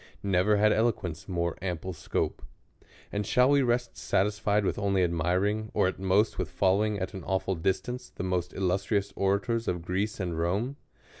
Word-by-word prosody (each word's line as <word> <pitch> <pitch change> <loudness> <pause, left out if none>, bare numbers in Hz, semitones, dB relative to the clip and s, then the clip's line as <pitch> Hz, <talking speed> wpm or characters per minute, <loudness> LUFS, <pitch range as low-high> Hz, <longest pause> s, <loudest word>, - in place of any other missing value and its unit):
Never 100 +2 +3
had 105 +1 +4
eloquence 100 -8 -1
more 85 -2 -1
ample 90 0 -3
scope. 80 - -2 0.7
And 105 0 -1
shall 125 +6 +3
we 140 -1 +5
rest 120 -1 0
satisfied 105 +1 +1
with - - -1
only 100 -2 +2
admiring, 90 +6 0
or - - +3
*at 95 - -3
most 95 +3 +2
with 90 -4 -2
following 100 +4 +2
at 95 -1 -4
an 95 -3 -7
awful 95 +1 0
distance, 110 +9 -2
the - - -7
most 90 -1 -1
illustrious 100 +2 0
orators 100 +4 0
of 90 -1 -2
Greece 100 +4 -1
and 85 -4 -2
Rome 100 +11 0
95 Hz, 165 wpm, -28 LUFS, 90-105 Hz, 0.7 s, we